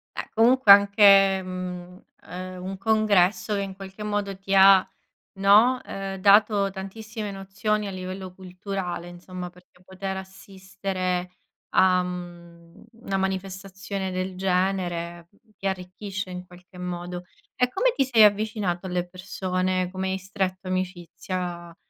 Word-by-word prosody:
Eh, - - -5
comunque 235 -1 +5
anche 200 -1 +7
mhmm, 180 0 -7 0.3
uhm, 185 0 -7
un 190 +1 -5
congresso 210 -1 +2
che 200 - -1
in 195 -1 -5
qualche 195 +2 -9
modo 205 -1 -2
ti 195 0 -4
ha, 190 0 +7 0.5
no, 215 +6 +5
ehm, 195 0 -5
dato 200 +1 +4
tantissime 215 +2 -7
nozioni 200 +2 -2
a - - -5
livello 185 0 -7
culturale, 185 -1 -5
insomma, 180 0 -8
perché 180 0 -22
poter 190 +1 -5
assistere 190 -1 -4 0.4
a, 185 -1 +5
mhmm, 175 -2 -9 0.2
una 195 0 -1
manifestazione 190 0 -4
del 185 0 -3
genere 180 -2 -1 0.3
ti 195 - -3
arricchisce 190 +1 -5
in 180 0 -7
qualche 180 +1 -16
modo. 180 0 -5 0.3
E 250 -1 +2
come - - +2
ti 275 - +3
sei 235 -4 +5
avvicinato 205 -3 +1
alle 180 0 -2
persone, 185 0 -2
come 190 0 -3
hai 190 - -1
stretto 190 -1 -4
amicizia 180 -1 -4
190 Hz, 130 wpm, -25 LUFS, 180-200 Hz, 0.5 s, anche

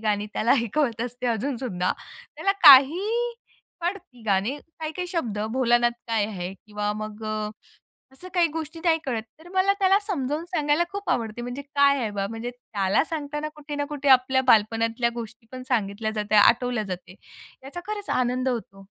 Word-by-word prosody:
गाणी 210 -1 0
त्याला 230 - +2
ऐकवत 235 0 0
असते 245 +1 -4
अजून 240 +3 -1
सुद्धा. 185 -8 -1 0.4
त्याला 390 - +1
काही 300 +8 +8 0.7
कळत 355 -5 -4
गाणे, 200 +7 +1 0.2
काही-काही 320 +3 -4
शब्द, 285 - -2
भोलानाथ 240 -1 +3 0.2
काय 225 -3 +1
आहे? 185 -3 -5
किंवा 210 +1 -4
मग 215 0 -7
अ, 215 0 -2 0.6
असं 360 +7 -11
काही 345 -1 +4
गोष्टी 320 +1 -6
नाही 325 -1 +4
कळत. 235 -5 -2 0.2
तर 330 +2 -15
मला 380 +1 +4
त्याला 390 0 +4
समजावून 300 -5 -2
सांगायला 325 -2 +1
खूप 400 0 -4
आवडते, 230 0 -2
म्हणजे 245 +3 -5
काय 280 0 +3
आहे 220 -4 -1
बा? 200 -1 -2
म्हणजे 225 +2 -5
त्याला 210 -3 0
सांगताना 300 -1 -4
कुठे 300 -1 -8
ना 290 - -1
कुठे 285 -1 -2
आपल्या 260 0 +5
बालपणातल्या 230 +1 +3
गोष्टी 225 0 -8
पण 255 0 -7
सांगितल्या 220 -2 -1
जातात, 215 -1 +1
आठवल्या 245 -1 +2
जाते, 185 -1 -7 0.5
याचा 285 +6 -7
खरंच 420 -1 -5
आनंद 255 +1 +1
होतो. 195 -5 -5
250 Hz, 165 wpm, -25 LUFS, 220-300 Hz, 0.7 s, काही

